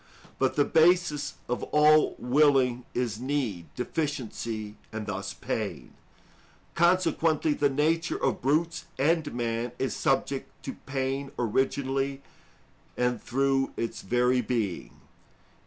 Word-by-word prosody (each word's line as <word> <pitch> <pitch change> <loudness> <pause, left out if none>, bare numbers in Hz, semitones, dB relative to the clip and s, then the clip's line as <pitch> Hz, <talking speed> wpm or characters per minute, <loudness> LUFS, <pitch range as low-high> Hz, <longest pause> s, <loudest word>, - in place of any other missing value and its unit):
But 130 -1 +1
the 145 - +3
basis 165 -3 +3
of 125 - -2
all 150 0 +4
willing 130 -2 +3
is 120 -3 -1
need, 125 - -2
deficiency, 115 -7 -3 0.2
and 110 -1 -5
thus 100 -1 -4
pain. 95 - -4 0.8
Consequently, 165 -3 +2
the 145 -1 +2
nature 160 +4 +1
of - - -1
brutes 160 +6 0
and 160 +4 +1
man 120 0 -2
is 130 -4 -1
subject - - 0
to - - -4
pain 135 0 -2
originally 135 +3 0 0.7
and 125 -2 0
through 135 +1 +1
its 115 - -3
very 125 +4 +2
being. 110 -6 -3
135 Hz, 110 wpm, -28 LUFS, 120-150 Hz, 0.8 s, all